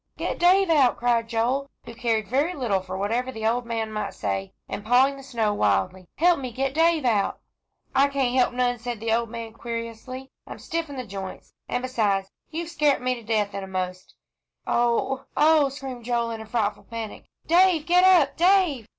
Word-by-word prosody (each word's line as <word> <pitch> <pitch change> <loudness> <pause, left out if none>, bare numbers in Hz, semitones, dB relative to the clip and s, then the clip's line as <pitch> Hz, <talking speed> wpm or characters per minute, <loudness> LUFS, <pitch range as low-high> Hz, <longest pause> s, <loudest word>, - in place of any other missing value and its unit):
"Get - - -3
Dave 365 +1 +4
out," 275 -6 +4
cried 235 -1 +1
Joel, 250 +5 0 0.2
who 235 - -9
cared 225 -3 -1
very 295 +8 0
little 230 -8 0
for 185 0 -6
whatever 230 +6 -1
the 220 -3 -5
old 235 +2 0
man 225 -2 -2
might 210 -2 -4
say, 95 -2 -3 0.2
and 205 - -5
pawing 255 +5 +4
the 275 - -10
snow 230 -6 -1
wildly. 185 -2 0
"Help 345 0 +3
me 255 -2 -5
get 265 +3 -2
Dave 325 -2 +3
out." 210 -5 +1 0.5
"I 275 +1 +4
can't 275 -3 0
help 255 -1 +3
none," 245 -1 0
said 235 -1 -5
the 225 0 0
old 230 0 0
man, 230 -1 -7
querulously. 235 +3 -6 0.2
"I'm - - -8
stiff 330 -1 -4
in 285 - -7
th' 255 -3 -6
jints, 190 -1 -8 0.2
an' 245 - -2
beside, 210 -6 0 0.2
you've 330 +1 -5
scart 300 -4 +2
me 255 0 0
to 240 - -8
death, 215 -2 0
eenamost." 185 -2 -5 0.5
"Oh 240 +2 0
oh!" 305 -2 +5
screamed 265 -3 -8
Joel, 235 -1 0
in 225 -1 -5
a 220 - -10
frightful 215 -3 -1
panic. 230 -2 -7 0.2
"Dave 350 -2 +4
get 360 +1 +4
up, 350 -7 +5
Dave!" 345 - +3
245 Hz, 190 wpm, -25 LUFS, 220-275 Hz, 0.5 s, oh